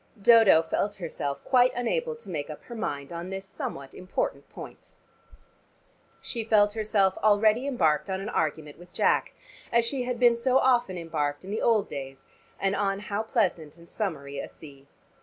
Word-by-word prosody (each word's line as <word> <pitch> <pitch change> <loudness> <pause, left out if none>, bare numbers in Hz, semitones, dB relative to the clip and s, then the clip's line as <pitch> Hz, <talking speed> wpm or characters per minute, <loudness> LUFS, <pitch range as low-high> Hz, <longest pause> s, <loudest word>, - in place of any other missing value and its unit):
Dodo 210 -6 +6
felt 200 +5 -1
herself 145 -6 -5
quite 255 -1 +4
unable 475 - -1
to 465 - -12
make 150 -3 -4
up 155 - -9
her 240 - -10
mind 170 -10 -4
on 170 +2 -6
this 195 0 -5
somewhat 140 -7 -7
important 185 0 -4
point. - - -12 1.3
She 230 -2 -3
felt 210 -2 +3
herself 210 -3 +1
already 215 +4 +3
embarked 155 - +1
on 190 0 -2
an 195 - -5
argument 155 -1 -2
with 175 0 -15
Jack, - - +1 0.4
as 235 0 +3
she 260 +2 -1
had 250 -1 -3
been 240 -1 +5
so 255 +2 +2
often 240 -8 +2
embarked 155 -2 -3
in 195 - -7
the 215 - -2
old 220 -4 +2
days, 135 -1 -8 0.3
and 195 0 +1
on 195 -1 0
how 205 +1 -3
pleasant 180 - -1
and 170 0 -16
summery 140 -10 -4
a - - -6
sea. 140 -3 -14
195 Hz, 175 wpm, -27 LUFS, 160-230 Hz, 1.3 s, Dodo